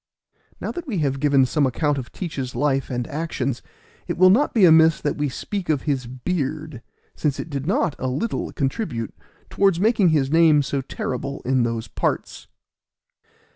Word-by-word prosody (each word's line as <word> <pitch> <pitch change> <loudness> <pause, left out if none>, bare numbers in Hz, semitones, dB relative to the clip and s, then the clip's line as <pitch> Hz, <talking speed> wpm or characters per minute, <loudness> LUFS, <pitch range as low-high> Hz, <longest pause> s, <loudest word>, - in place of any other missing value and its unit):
Now - - -3
that 350 -2 -7
we 220 -8 -2
have 140 -4 0
given 140 -2 +4
some 140 +2 +1
account 145 +3 0
of 125 - -8
Teach's 140 -8 -5
life 135 -2 0
and 125 -2 -2
actions, 140 -5 -3 0.5
it - - -3
will 185 +1 +7
not 265 +9 +3
be 215 -5 +5
amiss 160 -1 +6
that 145 - -1
we 145 -1 -1
speak 190 +7 -5
of 145 -4 +1
his 135 -5 -1
beard, 150 +1 -3 0.3
since 145 -2 -1
it 155 +4 -6
did 140 +1 -4
not 205 - +1
a 130 - -2
little 175 - -2
contribute 135 - -3 0.4
towards 195 -3 +2
making 210 -2 +3
his 145 -4 +1
name 160 -3 +5
so 140 0 -2
terrible 135 +1 -5
in 130 0 +2
those 115 -1 -2
parts. - - -3
145 Hz, 175 wpm, -22 LUFS, 130-165 Hz, 0.5 s, will